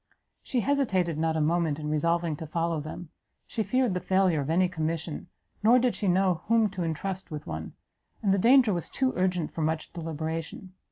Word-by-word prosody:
She 250 - -1
hesitated 190 - +1
not 160 0 +1
a - - +1
moment 160 -1 +1
in 150 -1 -5
resolving 165 +2 +1
to 160 - -7
follow 165 +1 -1
them: 155 +2 -8 0.4
she 225 - -3
feared 255 -1 +1
the 180 - -1
failure 185 -3 +2
of 140 - -4
any 180 +3 +3
commission, 165 -1 -3 0.3
nor 230 +4 +6
did 250 -1 +2
she 205 - -3
know 185 -1 +2
whom 225 -2 +3
to 190 -2 -3
entrust 185 +4 -3
with 150 -2 -6
one: 80 +1 -6 0.5
and 195 -2 +3
the 195 - +2
danger 240 0 +5
was 175 -2 -3
too 260 -1 0
urgent 180 -3 0
for 165 - -4
much 155 0 -2
deliberation. 165 +2 -5
175 Hz, 190 wpm, -28 LUFS, 160-195 Hz, 0.5 s, nor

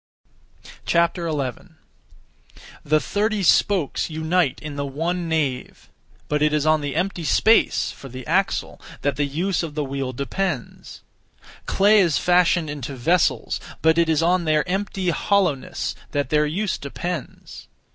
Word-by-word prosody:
11. 165 -2 -1 1.1
The 155 +1 +3
thirty 210 +3 -1
spokes 180 -2 +2
unite 160 -1 0
in 150 -2 -7
the 140 - -2
one 165 +5 -2
nave; 140 -6 -2 0.4
but 150 0 -1
it 150 0 +3
is 150 -1 +1
on 155 -1 +3
the 145 -1 -4
empty 185 -2 -1
space 220 +8 +3
(for 135 - -11
the 130 +1 -9
axle), 190 +5 -1 0.2
that 145 -2 +1
the 145 +2 0
use 175 +7 -1
of 160 -3 -6
the 150 - -1
wheel 135 -1 -3
depends. 140 - -4 0.6
Clay 210 +2 +4
is 170 -6 +3
fashioned 175 -2 +3
into 145 -2 -5
vessels; 165 +8 +1 0.2
but 160 +1 +4
it 165 -1 +2
is 160 0 +2
on 175 +1 +2
their 155 +1 +1
empty 190 -1 -1
hollowness, 180 -7 0 0.2
that 145 -3 -1
their 150 0 +3
use 190 +5 -2
depends. 170 +3 -6
160 Hz, 140 wpm, -22 LUFS, 145-180 Hz, 1.1 s, Clay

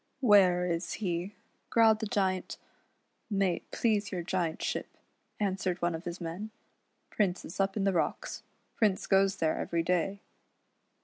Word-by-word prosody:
" - - -45
Where 180 -3 +6
is 170 0 -2
he," 180 0 -3 0.3
growled 225 -2 +5
the 220 - -2
Giant. 190 -4 -1 0.4
" - - -46
May 195 -4 +1
it - - -14
please 210 -3 0
your 180 -3 -3
Giantship," 170 -2 -2 0.5
answered 190 -3 -1
one 175 0 0
of 165 +1 -6
his 175 +1 -5
men, 175 +6 -5 0.3
" - - -46
Prince 190 -4 0
is 170 - -9
up 195 +1 +1
in 200 - 0
the 195 -1 +2
rocks. 170 - -1 0.3
Prince 210 -4 +2
goes 195 0 +3
there 160 -1 0
every 170 -1 -1
da} 180 +3 +1
190 Hz, 165 wpm, -30 LUFS, 175-200 Hz, 0.5 s, Where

